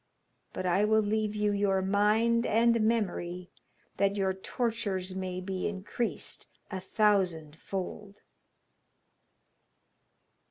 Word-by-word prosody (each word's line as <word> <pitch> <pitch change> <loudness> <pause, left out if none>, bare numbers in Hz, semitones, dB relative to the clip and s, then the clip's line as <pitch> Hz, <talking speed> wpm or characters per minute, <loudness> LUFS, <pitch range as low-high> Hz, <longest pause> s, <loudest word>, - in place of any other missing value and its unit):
But 185 - -4
I 185 +3 +3
will 220 0 +4
leave 215 0 0
you 210 0 +1
your 200 -2 +1
mind 215 +4 +3
and 230 +1 +3
memory, 180 -5 -1 0.5
that 200 0 +2
your 190 -2 +1
tortures 195 -2 -2
may 185 -1 -3
be 185 0 -3
increased 210 +4 -3 0.2
a 190 - -3
thousand 185 -6 +1
fold.' 195 +3 -6
200 Hz, 105 wpm, -30 LUFS, 185-215 Hz, 0.5 s, will